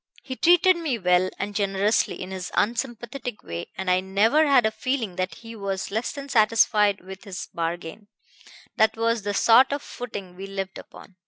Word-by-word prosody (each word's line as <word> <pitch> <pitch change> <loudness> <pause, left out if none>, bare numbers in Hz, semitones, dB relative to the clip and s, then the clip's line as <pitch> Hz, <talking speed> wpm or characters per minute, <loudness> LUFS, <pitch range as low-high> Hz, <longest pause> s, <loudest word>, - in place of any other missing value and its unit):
He 260 - -6
treated 355 +4 +5
me 310 -8 -2
well 180 -2 +2
and 205 +1 -4
generously 200 +1 +1
in 185 +1 -6
his 185 -1 -5
unsympathetic 240 +1 -2
way, 85 0 -6
and 190 +1 -5
I 180 0 +3
never 215 +11 +3
had 265 -5 +5
a 220 - +2
feeling 220 -3 -2
that 185 0 -2
he 230 0 -11
was 195 -3 -4
less 220 +4 -2
than 280 -1 -8
satisfied 215 -4 +3
with 190 +1 -11
his 190 -2 -7
bargain 170 +4 -4 0.7
that 220 0 +3
was 230 0 +1
the 205 0 -3
sort 240 +6 +5
of 285 0 -3
footing 200 -7 -8
we 195 +2 -7
lived 195 -1 -5
upon. 185 - -15
210 Hz, 180 wpm, -24 LUFS, 190-240 Hz, 0.7 s, treated